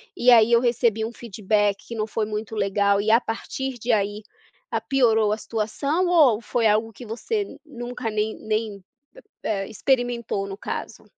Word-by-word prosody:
e 250 Hz, +1 st, +4 dB
aí 230 Hz, -1 st, +6 dB
eu 235 Hz, -, +6 dB
recebi 235 Hz, -2 st, +1 dB
um 225 Hz, -, -3 dB
feedback 205 Hz, -3 st, -1 dB
que 235 Hz, -, -6 dB
não 215 Hz, -1 st, -2 dB
foi 220 Hz, 0 st, -1 dB
muito 215 Hz, +1 st, -5 dB
legal", 200 Hz, 0 st, +2 dB
e 215 Hz, +2 st, +1 dB
a 230 Hz, -, +6 dB
partir 260 Hz, +3 st, -4 dB
de 240 Hz, +1 st, -1 dB
aí, 205 Hz, 0 st, 0 dB, 0.5 s
a -, -, 0 dB
piorou 225 Hz, -6 st, +2 dB
a 215 Hz, -, -2 dB
situação, 275 Hz, -, -1 dB
ou 300 Hz, -11 st, +5 dB
foi 230 Hz, -1 st, +1 dB
algo 220 Hz, +1 st, +1 dB
que 240 Hz, -, -11 dB
você 400 Hz, -, -3 dB
nunca 245 Hz, -4 st, -5 dB
nem 215 Hz, 0 st, -1 dB
nem 215 Hz, -2 st, -3 dB, 0.6 s
e -, -, -2 dB
eh, 195 Hz, -2 st, -1 dB
experimentou, 235 Hz, -3 st, -1 dB
no 195 Hz, 0 st, -6 dB
caso? -, -, -6 dB
220 Hz, 175 wpm, -24 LUFS, 210-240 Hz, 0.6 s, aí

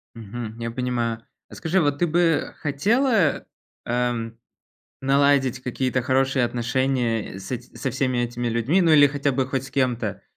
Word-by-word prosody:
Мгм, 115 Hz, 0 st, -7 dB
я 115 Hz, 0 st, -3 dB
понимаю. 120 Hz, -2 st, -2 dB, 0.2 s
А -, -, -12 dB
скажи, 175 Hz, +3 st, 0 dB
вот 145 Hz, -2 st, +1 dB
ты 175 Hz, -, +2 dB
бы 165 Hz, -1 st, +1 dB
хотела, 200 Hz, -, +1 dB, 0.4 s
ам, 120 Hz, -1 st, -2 dB, 0.7 s
наладить 135 Hz, -2 st, +3 dB
какие-то 130 Hz, 0 st, -1 dB
хорошие 130 Hz, 0 st, +2 dB
отношения 120 Hz, -3 st, -1 dB
с 95 Hz, -, -8 dB
эт 120 Hz, -1 st, -4 dB
со 135 Hz, -, -2 dB
всеми 130 Hz, 0 st, -1 dB
этими 120 Hz, 0 st, -2 dB
людьми, 120 Hz, +11 st, +1 dB
ну, 165 Hz, -3 st, +4 dB
или 145 Hz, -1 st, +8 dB
хотя 140 Hz, 0 st, -1 dB
бы 130 Hz, 0 st, 0 dB
хоть 130 Hz, 0 st, -2 dB
с 135 Hz, -, -10 dB
кем-то 120 Hz, -6 st, -1 dB
130 Hz, 155 wpm, -23 LUFS, 120-145 Hz, 0.7 s, или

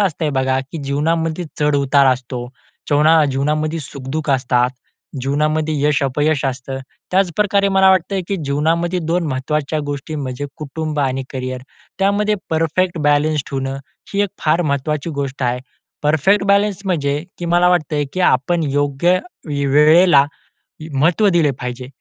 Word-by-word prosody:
असतंय 160 Hz, -6 st, 0 dB
बघा, 130 Hz, -1 st, +1 dB
की 135 Hz, +4 st, -8 dB
जीवनामध्ये 160 Hz, +4 st, -1 dB
चढ-उतार 140 Hz, -2 st, +3 dB
असतो. 125 Hz, -1 st, -5 dB, 0.4 s
जीवना 155 Hz, +2 st, +4 dB
जीवनामध्ये 150 Hz, +4 st, -1 dB
सुख-दुःख 145 Hz, +2 st, -5 dB
असतात, 125 Hz, -2 st, +2 dB, 0.5 s
जीवनामध्ये 155 Hz, +3 st, 0 dB
यश-अपयश 145 Hz, 0 st, +1 dB
असतं. 135 Hz, 0 st, -3 dB, 0.3 s
त्याच 190 Hz, -1 st, +2 dB
प्रकारे 200 Hz, -1 st, +2 dB
मला 190 Hz, 0 st, +5 dB
वाटतं 190 Hz, +1 st, +1 dB
आहे, 190 Hz, -, -1 dB
की 200 Hz, -, -1 dB
जीवनामध्ये 165 Hz, +5 st, 0 dB
2 170 Hz, +1 st, 0 dB
महत्त्वाच्या 150 Hz, +2 st, -2 dB
गोष्टी 145 Hz, +2 st, -5 dB
म्हणजे 140 Hz, -1 st, -4 dB
कुटुंब 155 Hz, +1 st, -4 dB
आणि 135 Hz, -1 st, 0 dB
करिअर. 130 Hz, -1 st, -4 dB, 0.4 s
त्यामध्ये 205 Hz, +2 st, +2 dB, 0.2 s
परफेक्ट 165 Hz, +2 st, 0 dB
बॅलन्स 145 Hz, 0 st, +2 dB
ठेवणं 135 Hz, -1 st, -3 dB, 0.4 s
ही 200 Hz, -, +3 dB
एक 200 Hz, -, 0 dB, 0.2 s
फार 160 Hz, +3 st, +3 dB
महत्वाची 150 Hz, +2 st, -1 dB
गोष्ट 135 Hz, -1 st, -4 dB
आहे. 125 Hz, 0 st, 0 dB, 0.4 s
परफेक्ट 175 Hz, +7 st, +3 dB
बॅलन्स 200 Hz, 0 st, +2 dB
म्हणजे 145 Hz, -5 st, -1 dB, 0.2 s
की 175 Hz, -, -5 dB
मला 175 Hz, +1 st, +4 dB
वाटतं 155 Hz, -4 st, +1 dB
आहे 145 Hz, -, +1 dB
की 185 Hz, -, -3 dB
आपण 165 Hz, +2 st, +2 dB
योग्य 145 Hz, +6 st, +2 dB, 0.3 s
वे 145 Hz, -1 st, -2 dB
वेळेला, 150 Hz, +1 st, +6 dB, 0.7 s
महत्त्व 165 Hz, +9 st, +3 dB
दिले 165 Hz, -5 st, +3 dB
पाहिजे, 125 Hz, 0 st, -5 dB
150 Hz, 140 wpm, -18 LUFS, 135-170 Hz, 0.7 s, वेळेला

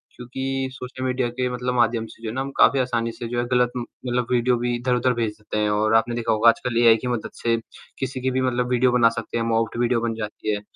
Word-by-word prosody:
क्योंकि 130 Hz, +2 st, -3 dB
social 130 Hz, 0 st, -7 dB
media 125 Hz, -1 st, 0 dB
के 125 Hz, +1 st, -2 dB
मतलब 125 Hz, 0 st, -2 dB
माध्यम 115 Hz, -1 st, +2 dB
से 115 Hz, -, -16 dB
जो 110 Hz, -, -3 dB
है 110 Hz, -, -6 dB
ना, 135 Hz, -, -1 dB
हम 140 Hz, -, -4 dB
काफ़ी 140 Hz, -, +5 dB
आसानी 120 Hz, -2 st, 0 dB
से 120 Hz, -, -6 dB
जो 120 Hz, 0 st, -1 dB
है 120 Hz, -, 0 dB
गलत 125 Hz, 0 st, +3 dB
उम, 120 Hz, -, -3 dB, 0.2 s
मतलब 120 Hz, -1 st, 0 dB
वीडियो 125 Hz, 0 st, +2 dB
भी 120 Hz, 0 st, -1 dB
इधर-उधर 125 Hz, +1 st, +1 dB
भेज 115 Hz, -2 st, -1 dB
देते 105 Hz, -, -5 dB
हैं 105 Hz, -, +1 dB
और 110 Hz, +1 st, +1 dB
आपने 120 Hz, +1 st, +2 dB
देखा 115 Hz, -1 st, -1 dB
होगा 110 Hz, +2 st, +5 dB
आजकल 120 Hz, 0 st, 0 dB
एआई 115 Hz, -1 st, +7 dB
की 125 Hz, -, -5 dB
मदद 120 Hz, -3 st, -3 dB
से 115 Hz, -1 st, +2 dB, 0.4 s
किसी 130 Hz, 0 st, -3 dB
की 130 Hz, +1 st, 0 dB
भी 130 Hz, +1 st, 0 dB
मतलब 125 Hz, -1 st, 0 dB
वीडियो 125 Hz, 0 st, +3 dB
बना 120 Hz, -2 st, +5 dB
सकते 115 Hz, -, -5 dB
हैं, 115 Hz, -, 0 dB
मॉर्फ्ड 115 Hz, 0 st, 0 dB
वीडियो 120 Hz, -1 st, +2 dB
बन 115 Hz, -1 st, -1 dB
जाती 105 Hz, -1 st, -3 dB
है। 105 Hz, -, -5 dB
120 Hz, 260 wpm, -23 LUFS, 115-125 Hz, 0.4 s, एआई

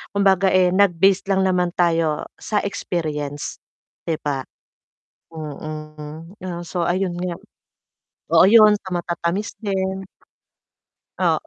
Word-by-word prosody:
kumbaga, 195 Hz, -1 st, +4 dB
eh, 185 Hz, -1 st, +5 dB
nag-based 190 Hz, 0 st, +3 dB
lang 190 Hz, 0 st, +2 dB
naman 180 Hz, -1 st, +1 dB
tayo 165 Hz, -3 st, +1 dB
sa 210 Hz, -1 st, -1 dB
experience, 155 Hz, -8 st, -3 dB, 0.5 s
'di 160 Hz, -2 st, 0 dB
ba? 135 Hz, -3 st, -2 dB, 0.9 s
Mm. 155 Hz, +2 st, -8 dB
oh, 175 Hz, -2 st, -4 dB
so 175 Hz, +1 st, -2 dB
ayun 180 Hz, 0 st, 0 dB
nga. 180 Hz, 0 st, -3 dB, 1.0 s
Oh, 165 Hz, +2 st, +7 dB
ayun 215 Hz, 0 st, +8 dB
sa 190 Hz, -, -9 dB
matatamis 175 Hz, +4 st, -2 dB
din. 190 Hz, -2 st, -2 dB, 1.1 s
Oo. -, -, +1 dB
175 Hz, 110 wpm, -22 LUFS, 160-190 Hz, 1.1 s, ayun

